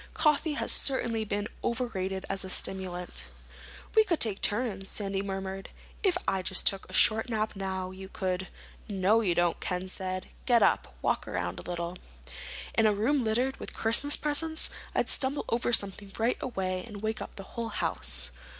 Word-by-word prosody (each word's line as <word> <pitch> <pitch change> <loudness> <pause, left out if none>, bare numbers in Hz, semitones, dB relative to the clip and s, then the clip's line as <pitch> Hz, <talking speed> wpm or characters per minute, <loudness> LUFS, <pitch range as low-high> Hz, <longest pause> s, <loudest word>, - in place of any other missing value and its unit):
Coffee 300 0 +2
has - - 0
certainly 235 -5 +1
been 205 0 -2 0.2
overrated 195 -6 -2
as 195 0 -2
a 190 - -6
stimulant." 180 -1 -1 0.7
"We 440 - +8
could 350 -6 0
take 210 -4 +4
turns," 205 -3 0
Sandy 195 -2 -2
murmured. 195 0 -5 0.3
"If 375 -4 +3
I 190 -1 +1
just 185 0 0
took 195 -1 +1
a - - -10
short 220 +2 +5
nap 220 -2 -1
now, 190 -1 -3
you 190 0 -9
could—" 185 -2 -2 0.4
"No, 200 +3 +3
you 180 -6 +1
don't," 175 0 +2
Ken 180 0 -3
said. 185 -1 -4 0.2
"Get 240 -3 +5
up. - - +2
Walk - - 0
around - - -3
a - - -8
little." 175 0 -3 0.8
"In 225 -1 +4
a 210 - +4
room 255 +6 +2
littered 245 +4 0
with - - -8
Christmas 250 +6 +5
presents? 315 +2 0 0.2
I'd - - +2
stumble 270 +2 0
over 235 +1 +1
something 200 -2 +2
right 230 +2 +1
away 185 -7 -2
and 210 -1 -9
wake 220 0 -1
up - - -7
the 195 - -7
whole 230 -1 -3
house." - - +1
205 Hz, 175 wpm, -29 LUFS, 190-235 Hz, 0.8 s, We